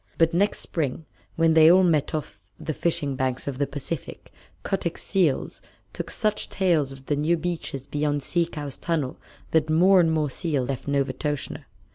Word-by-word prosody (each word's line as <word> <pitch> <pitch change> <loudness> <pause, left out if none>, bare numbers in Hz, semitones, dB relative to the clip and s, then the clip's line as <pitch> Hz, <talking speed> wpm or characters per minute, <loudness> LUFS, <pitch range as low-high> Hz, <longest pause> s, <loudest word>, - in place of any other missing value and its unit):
But 165 0 +3
next 200 +4 +1
spring, 155 -1 -3 0.3
when 165 0 +3
they 160 0 +8
all 185 +1 +6
met 160 -4 +2
off 150 -8 -5 0.2
the 155 - -3
fishing 155 -4 0
banks 130 0 -2
of 135 -2 -4
the 140 - +1
Pacific, 145 +2 -6 0.3
Kotick's 175 -4 -2
seals 175 -9 0 0.3
told - - -5
such 215 -2 -1
tales 165 -8 +1
of 135 0 -12
the 145 - 0
new 155 +4 +1
beaches 160 -5 -4
beyond 145 -1 -1
Sea 170 -1 +1
Cow's 145 -4 -6
tunnel 155 -7 -2 0.3
that 160 -1 +2
more 180 +4 +5
and 165 -2 +4
more 155 -3 0
seals 145 -5 -1
left 135 0 -4
Novastoshnah. 140 +1 -2
155 Hz, 170 wpm, -25 LUFS, 140-170 Hz, 0.3 s, they